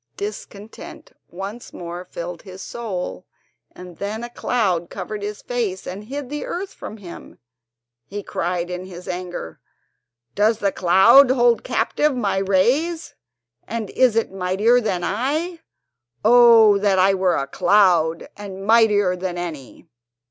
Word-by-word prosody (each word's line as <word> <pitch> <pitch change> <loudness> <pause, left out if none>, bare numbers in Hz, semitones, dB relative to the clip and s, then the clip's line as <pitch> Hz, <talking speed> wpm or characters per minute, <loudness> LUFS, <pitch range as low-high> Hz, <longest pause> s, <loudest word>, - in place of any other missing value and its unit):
Discontent 210 - -8 0.2
once 195 +6 -8
more 175 +1 -7
filled 175 -1 -7
his 190 -1 -10
soul, 190 -6 -5 0.4
and 180 -2 -12
when 210 +3 -4
a 240 - -7
cloud 190 -10 -1
covered 215 -1 -6
his 205 0 -6
face, 225 -7 -3
and 200 +3 -7
hid 275 +3 -6
the 295 - -4
earth 385 +2 -5
from 215 - -9
him, 185 -5 -11 0.7
he 205 +1 -6
cried 175 0 -3
in 180 +1 -5
his 180 -1 -11
anger: 180 - -6 0.7
"Does 215 +2 +2
the 200 -3 0
cloud 190 +10 +6
hold 240 -2 +3
captive 300 -2 0
my 205 -5 0
rays, 250 - +1 0.5
and 225 -2 -4
is 255 -4 +3
it 225 - 0
mightier 195 +6 +2
than 185 -6 -2
I? 305 - -2 0.7
Oh, 230 -3 +7
that 200 -1 +2
I 190 +1 +4
were 185 -2 +1
a 135 - -1
cloud, 170 0 +2
and 195 -1 -8
mightier 210 -4 +4
than 180 -1 -4
any!" 160 -7 -7
200 Hz, 140 wpm, -21 LUFS, 180-230 Hz, 0.7 s, Oh